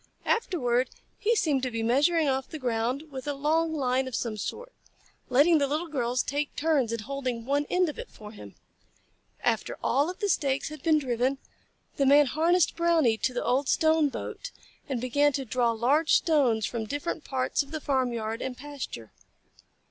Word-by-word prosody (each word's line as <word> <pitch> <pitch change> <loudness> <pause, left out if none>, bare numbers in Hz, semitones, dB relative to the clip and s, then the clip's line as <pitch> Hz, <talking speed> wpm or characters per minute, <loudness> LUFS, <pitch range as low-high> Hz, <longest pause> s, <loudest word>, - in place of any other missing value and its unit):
Afterward 260 - +1 0.3
he 450 +3 +2
seemed 295 -10 +1
to 255 - -1
be 230 -2 -3
measuring 295 +7 +3
off 265 -1 -1
the 315 - -6
ground 255 +3 -2
with 265 +1 -7
a 290 - -1
long 315 +3 +1
line 260 -2 0
of 255 - -4
some 225 -2 -2
sort, - - -6 0.6
letting 300 +6 +5
the 280 - +1
Little 310 +4 -2
Girls 250 -4 0
take 290 +1 -3
turns 290 -7 +1
in 230 -1 -3
holding 255 -1 -4
one 285 +2 0
end 360 0 +2
of 305 - -6
it - - -7
for 210 -1 -12
him. 105 - -12 0.9
After - - 0
all 280 +6 +2
of 360 - -6
the 410 - -1
stakes 280 -7 0
had 305 -2 -9
been 315 +1 +3
driven, 260 -1 0 0.6
the 275 -2 +2
Man 290 +2 +7
harnessed 325 +5 +2
Brownie 325 -9 +3
to 260 - 0
the 245 - -3
old 265 +2 +1
stone 315 -2 +3
boat - - -6 0.4
and 260 -3 -1
began 285 +4 +2
to 270 -1 -2
draw 245 0 +1
large 260 +8 +2
stones 255 -10 +2
from 230 -2 -3
different 290 +4 -4
parts 260 0 -1
of 280 - -8
the 315 +1 -4
farmyard 240 -6 -1
and 255 -1 -4
pasture. 275 - -7
275 Hz, 185 wpm, -27 LUFS, 245-310 Hz, 0.9 s, Man